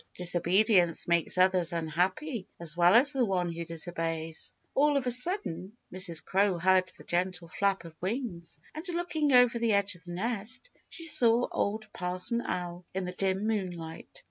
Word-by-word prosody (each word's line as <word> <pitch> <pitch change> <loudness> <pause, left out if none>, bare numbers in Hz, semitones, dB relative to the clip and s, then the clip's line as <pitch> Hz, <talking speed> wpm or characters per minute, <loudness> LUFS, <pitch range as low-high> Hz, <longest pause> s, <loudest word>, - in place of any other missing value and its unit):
Disobedience 180 0 +3
makes 170 0 +1
others 185 -2 +3
unhappy 185 - -2
as 165 -2 -2
well 175 +3 +5
as 280 +5 +6
the 265 -2 +1
one 180 -5 -1
who 170 0 -5
disobeys. 165 -1 -4 0.2
All 290 +1 +3
of 270 - -2
a 250 - +1
sudden 240 - +2 0.2
Mrs. 180 -3 +1
Crow 195 -1 +1
heard 185 +1 +2
the - - -14
gentle 180 -1 -2
flap 195 -2 -1
of 165 - -10
wings, 185 -4 -4 0.2
and 310 - -7
looking 320 -4 -1
over 245 -2 +5
the 230 -2 +1
edge 200 0 +1
of 175 -2 -16
the 175 - -7
nest, 230 - -4 0.2
she 330 - -7
saw 240 -6 +4
Old 215 +2 -2
Parson 180 +6 -2
Owl 175 -4 -4
in 190 -1 -2
the 180 - -4
dim 190 +2 -1
moonlight. 185 - -5
185 Hz, 170 wpm, -29 LUFS, 175-235 Hz, 0.2 s, as